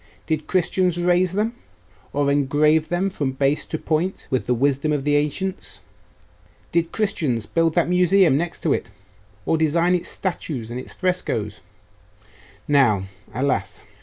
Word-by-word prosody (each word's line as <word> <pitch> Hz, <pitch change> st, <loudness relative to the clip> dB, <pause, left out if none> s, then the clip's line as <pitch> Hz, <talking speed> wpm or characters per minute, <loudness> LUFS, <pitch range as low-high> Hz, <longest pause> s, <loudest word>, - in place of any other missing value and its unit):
Did 155 Hz, -2 st, -2 dB
Christians 180 Hz, -1 st, +1 dB
raise 180 Hz, +1 st, +2 dB
them, 215 Hz, +4 st, 0 dB, 0.6 s
or 140 Hz, -1 st, +1 dB
engrave 150 Hz, +3 st, +2 dB
them 185 Hz, +3 st, 0 dB
from 140 Hz, -7 st, -2 dB
base 140 Hz, +2 st, 0 dB
to 160 Hz, -, -3 dB
point 160 Hz, +5 st, -2 dB
with 130 Hz, -, 0 dB
the 125 Hz, -, +2 dB
wisdom 140 Hz, +4 st, +1 dB
of 145 Hz, -2 st, 0 dB
the 145 Hz, +1 st, +2 dB
ancients? 165 Hz, +6 st, -2 dB, 0.9 s
Did 170 Hz, -1 st, +1 dB
Christians 150 Hz, -, -1 dB
build 165 Hz, -1 st, +1 dB
that 175 Hz, -, +3 dB
Museum 180 Hz, -2 st, +4 dB
next 170 Hz, +4 st, -3 dB
to 155 Hz, -, +3 dB
it, -, -, -3 dB, 0.6 s
or 165 Hz, -, +2 dB
design 165 Hz, +3 st, +2 dB
its 180 Hz, -, 0 dB
statues 145 Hz, -10 st, -4 dB
and 120 Hz, -, -4 dB
its -, -, -9 dB
frescoes 115 Hz, -, -2 dB, 1.1 s
now, 125 Hz, -10 st, +3 dB, 0.3 s
alas! 105 Hz, -7 st, -2 dB
155 Hz, 145 wpm, -22 LUFS, 140-180 Hz, 1.1 s, Museum